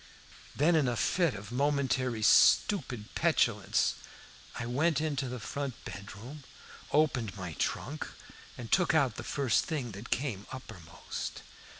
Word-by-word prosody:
Then, 165 +5 +4
in 150 -5 +3
a 120 - 0
fit 145 - +2
of 100 +2 -9
momentary 130 -4 0
stupid 125 - +4
petulance, - - +2 0.6
I 120 - -3
went 145 +5 +1
into 145 -4 -1
the 125 0 -5
front 140 +2 -4
bedroom, 105 +9 -9 0.5
opened 130 -9 +1
my 90 -3 -5
trunk, 145 - -2 0.5
and 115 -2 -8
took 180 -4 +3
out 135 -8 +2
the - - -5
first 135 -5 +1
thing 140 -8 -3
that 105 +4 -9
came 120 -7 -2
uppermost. 90 -11 -7
125 Hz, 130 wpm, -31 LUFS, 110-145 Hz, 0.6 s, Then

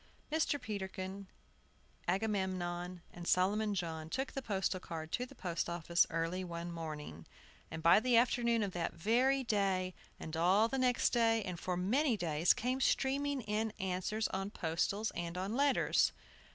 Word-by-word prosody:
Mr. 310 -2 +1
Peterkin, 190 -2 -5 0.8
Agamemnon, 185 -3 -1
and 175 0 -8
Solomon 205 +3 +2
John 160 -3 -3
took 265 +9 -2
the 270 - -4
postal 195 -5 -1
card 160 -2 -6
to 250 +1 -1
the 275 - -15
post 175 -7 -2
office 170 0 +2
early 165 +3 -1
one 170 -1 -5
morning, 150 - -7 0.4
and 160 - -6
by 170 +4 +7
the 245 +1 +3
afternoon 235 -1 +3
of 200 - -2
that 175 -2 -2
very 255 +8 +2
day, 195 -5 0 0.3
and 160 - -6
all 185 +7 +4
the 270 +3 -2
next 250 -1 +3
day, 225 -2 +3
and 180 -3 -5
for 180 +1 -2
many 235 - +2
days, 165 -2 +2
came 255 +3 0
streaming 275 +1 +1
in 215 0 -1
answers 190 +4 -1
on 195 +1 -3
postals 200 +4 -1
and 170 0 -4
on 195 +5 -2
letters. 280 0 +3
190 Hz, 155 wpm, -34 LUFS, 175-230 Hz, 0.8 s, by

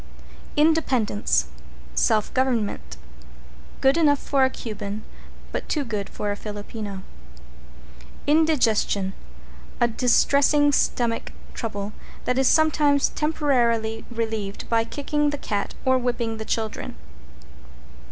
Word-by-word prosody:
=INDEPENDENCE= 235 - +2 0.5
Self 210 - +2
government. 235 - -1 0.8
Good 270 +4 +4
enough 295 -3 +4
for 275 0 +1
a 260 - +4
Cuban, 210 -4 -6 0.5
but - - -4
too 300 - 0
good 210 -4 -3
for 205 - -3
a - - -2
Filipino. 205 -1 -6 1.2
=INDIGESTION= 250 -11 +2 0.7
A 240 - +4
distressing 280 +5 +3
stomach 235 -4 0 0.2
trouble 205 -2 -4 0.3
that 250 +1 +1
is 265 - +3
sometimes 300 -3 +4
temporarily 235 -8 +1
relieved 220 -4 -3
by 230 -1 +3
kicking 295 +3 0
the 290 - -3
cat 205 -7 -3
or 260 0 +4
whipping 240 -2 -1
the 220 - -6
children. 220 0 -3
235 Hz, 105 wpm, -24 LUFS, 210-285 Hz, 1.2 s, Good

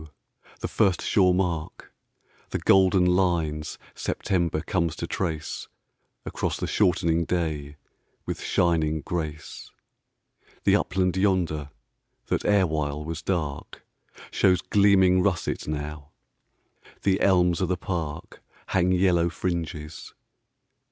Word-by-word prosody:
the - - -2
first 95 -6 +2
sure 95 -3 +4
mark, 90 -4 -2 0.6
The - - -2
golden 95 -1 +4
lines 85 -4 0 0.2
September 85 -4 -1
comes 85 -2 -1
to - - -4
traceAcross 80 -5 -5
the - - -2
shortening 85 -4 +2
day 75 -4 -2 0.5
with - - -4
shining 80 -3 +1
grace—The 80 -3 -5
upland 90 +1 0
yonder 90 -7 0 0.6
that - - -1
erewhile 75 -7 +1
was 80 +1 -5
darkShows 85 +2 -2
gleaming 95 -2 +5
russet 90 -2 -1
now. 75 -1 -5 0.9
The 95 -1 +2
elms 90 -2 +3
o' 90 - +1
the 90 0 -1
parkHang 85 +1 -3
yellow 85 -2 +3
fringes. 80 -3 -5
85 Hz, 95 wpm, -25 LUFS, 80-95 Hz, 0.9 s, gleaming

